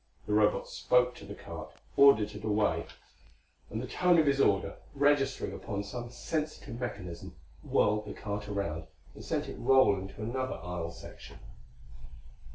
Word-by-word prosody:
The 105 - -2
Robot 105 0 +3
spoke 125 0 +2
to - - -12
the - - -7
cart; - - -8 0.2
ordered 110 -7 +6
it 105 0 -9
away; 105 -6 +1 0.8
and 110 - -3
the 125 - -3
tone 180 +6 +3
of 160 - +5
his 140 -1 +3
order, 100 -5 +2 0.2
registering 140 -1 +2
upon 100 -2 -4
some 120 +4 -6
sensitive 150 -3 -4
mechanism, 90 -9 -6 0.3
whirled 105 0 +1
the - - -5
cart 105 0 -4
around 90 -6 -3 0.3
and - - -11
sent - - -2
it - - -7
rolling 120 -7 +4
to 105 +2 -9
another 130 +3 -2
aisle 90 -1 -4
section. 85 - -11
105 Hz, 155 wpm, -31 LUFS, 100-130 Hz, 0.8 s, ordered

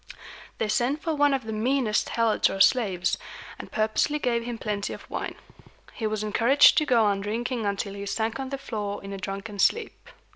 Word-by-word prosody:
They 220 - -1
sent 240 +7 +1
for 325 - 0
one 290 -1 +3
of 270 -2 0
the 220 - -4
meanest 230 0 +1
Helots 230 -2 +2
or 195 - -4
slaves, 195 -6 +3 0.4
and - - -9
purposely 220 +7 +1
gave 240 -5 0
him 240 0 -5
plenty 210 -2 -3
of - - -11
wine. - - -4 0.6
He 220 - -2
was 215 0 -2
encouraged 235 +7 +5
to 305 - -2
go 235 -5 +4
on 200 -1 +1
drinking 230 +2 -2
until 200 0 -2
he 200 0 -6
sank 225 +4 -2
on 265 -1 -4
the 275 - -3
floor 210 -7 -5
in 195 0 -7
a 195 - -6
drunken 200 +2 -6
sleep. 460 - 0
220 Hz, 195 wpm, -26 LUFS, 205-255 Hz, 0.6 s, encouraged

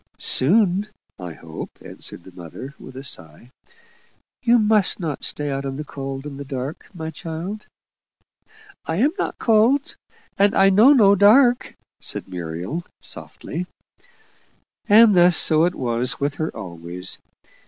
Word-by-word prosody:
"Soon, 195 - +2 0.3
I 90 -3 -7
hope," 80 0 -9
answered 85 - -9
the 95 - -14
mother, 90 - -10
with 130 - -12
a 135 - -7
sigh. 80 - -6 0.9
"You 240 -1 +4
must 210 -3 +2
not 155 -6 -4
stay 145 -1 0
out 135 0 -3
in 135 -1 -4
the 150 - -4
cold 135 -1 -7
and 140 -1 -8
the - - -5
dark, 135 +1 -6
my 160 -4 -6
child." 170 +7 -7 1.2
"I 160 - -1
am 260 - +2
not - - -2
cold, 235 +5 +2 0.4
and 200 0 +4
I 195 0 +5
know 220 +8 +7
no 210 -8 +6
dark," 240 +6 +4 0.2
said - - -4
Muriel, 90 - -5 0.2
softly. 175 +3 -6 1.2
And 215 0 +7
thus 175 0 +6
so 160 0 +4
it 180 - -1
was 125 +1 -1
with 145 0 -1
her 155 - -1
always. 85 +1 -6
160 Hz, 145 wpm, -22 LUFS, 130-205 Hz, 1.2 s, know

